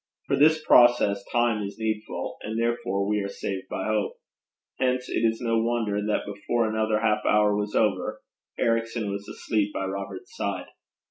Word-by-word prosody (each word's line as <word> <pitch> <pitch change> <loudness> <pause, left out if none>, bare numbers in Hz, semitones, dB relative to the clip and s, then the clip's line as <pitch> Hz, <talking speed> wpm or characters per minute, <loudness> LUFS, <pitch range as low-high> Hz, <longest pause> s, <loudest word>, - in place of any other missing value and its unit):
For - - +1
this 155 +2 +4
process 120 -3 +5
time 120 -2 +2
is 100 0 -5
needful; 110 -1 -3
and 110 +1 -3
therefore 100 -4 0
we 105 0 +1
are 100 - -2
saved 95 -1 -5
by - - -3
hope. 110 -1 0 0.6
Hence 125 0 +1
it - - -1
is 115 0 +2
no 115 -1 +1
wonder 115 -3 0
that 105 0 0
before 105 +3 -1
another 110 0 0
half 105 -2 +1
hour 105 -1 +3
was 105 0 -2
over, 100 -4 +1 0.4
Ericson 115 -2 0
was 100 0 -5
asleep 105 -2 -1
by 95 - -1
Robert's 95 0 -6
side. - - -3
110 Hz, 165 wpm, -26 LUFS, 100-115 Hz, 0.6 s, process